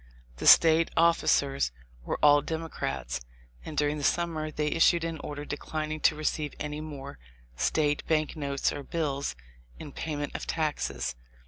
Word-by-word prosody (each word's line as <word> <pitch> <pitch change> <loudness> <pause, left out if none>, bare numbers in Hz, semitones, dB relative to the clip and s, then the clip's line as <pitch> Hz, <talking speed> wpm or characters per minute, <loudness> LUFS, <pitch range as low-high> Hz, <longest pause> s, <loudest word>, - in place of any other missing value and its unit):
The - - -2
State 165 0 +7
officers 145 - +3 0.3
were - - -2
all 145 -1 +7
Democrats, 70 - -4 0.4
and 155 - -8
during 150 0 +1
the - - -5
summer 160 -1 0
they 150 0 -2
issued 165 +1 +4
an 165 -2 -3
order 145 0 -6
declining 155 +1 -4
to 155 - +3
receive 150 -1 -2
any 150 0 -4
more 140 - -8 0.4
State 145 - +1
Bank 155 0 +1
notes 140 -3 -1
or 145 - -5
bills 140 - -2 0.4
in 150 - -9
payment 145 -1 -4
of - - -5
taxes. 155 - -2
150 Hz, 145 wpm, -28 LUFS, 145-160 Hz, 0.4 s, State